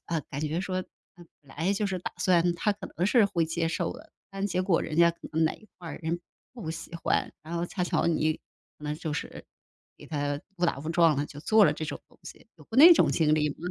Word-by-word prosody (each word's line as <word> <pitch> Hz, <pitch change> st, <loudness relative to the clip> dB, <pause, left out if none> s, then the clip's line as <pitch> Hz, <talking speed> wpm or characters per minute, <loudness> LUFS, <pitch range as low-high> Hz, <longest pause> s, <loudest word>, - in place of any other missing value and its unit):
呃， 165 Hz, -2 st, -1 dB
感 140 Hz, -, -4 dB
觉 155 Hz, +3 st, -1 dB
说 185 Hz, -1 st, -2 dB, 0.3 s
那 175 Hz, -, -13 dB, 0.2 s
本 135 Hz, -2 st, -17 dB
来 170 Hz, +6 st, +1 dB
就 205 Hz, +1 st, 0 dB
是 190 Hz, -2 st, -2 dB
打 180 Hz, -, -5 dB
算 175 Hz, -1 st, +3 dB
他 210 Hz, +5 st, +1 dB
可 200 Hz, -, -9 dB
能 180 Hz, -, +1 dB
是 225 Hz, +1 st, +5 dB
会 170 Hz, -5 st, 0 dB
接 165 Hz, +1 st, -1 dB
受 165 Hz, -, -1 dB
的， 320 Hz, +1 st, -14 dB, 0.2 s
但 195 Hz, 0 st, -2 dB
结 180 Hz, -2 st, -1 dB
果 185 Hz, -3 st, +2 dB
人 -, -, -4 dB
家 170 Hz, +1 st, +6 dB
可 170 Hz, -, -18 dB
能 160 Hz, +1 st, +1 dB
哪 160 Hz, -, +2 dB
一 215 Hz, -, -18 dB
块 175 Hz, -2 st, -9 dB
儿， -, -, -6 dB
人 165 Hz, +2 st, -2 dB, 0.3 s
不 220 Hz, -10 st, -6 dB
喜 165 Hz, +1 st, -8 dB
欢， 170 Hz, -, 0 dB
然 160 Hz, +2 st, -7 dB
后 170 Hz, -, -1 dB
恰 180 Hz, +1 st, -4 dB
巧 175 Hz, -, +1 dB
你 155 Hz, -2 st, +2 dB, 0.4 s
可 150 Hz, -, -12 dB
能 150 Hz, 0 st, -2 dB
就 155 Hz, 0 st, -4 dB
是 -, -, -6 dB, 0.5 s
给 -, -, -13 dB
他 145 Hz, -2 st, -2 dB, 0.2 s
误 175 Hz, -, +2 dB
打 165 Hz, -, -1 dB
误 150 Hz, +3 st, -6 dB
撞 165 Hz, -3 st, +4 dB
了， 145 Hz, -, 0 dB
就 145 Hz, -, -10 dB
做 215 Hz, +6 st, +5 dB
了 150 Hz, -, +4 dB
这 155 Hz, -, -5 dB
种 150 Hz, -, -5 dB
东 -, -, -24 dB
西， -, -, -12 dB
有 -, -, -16 dB
过 225 Hz, -, -7 dB
那 335 Hz, +5 st, +11 dB
种 -, -, +4 dB
经 155 Hz, -2 st, +3 dB
历 150 Hz, -1 st, +1 dB
吗？ -, -, -8 dB
170 Hz, 280 characters per minute, -28 LUFS, 155-185 Hz, 0.5 s, 那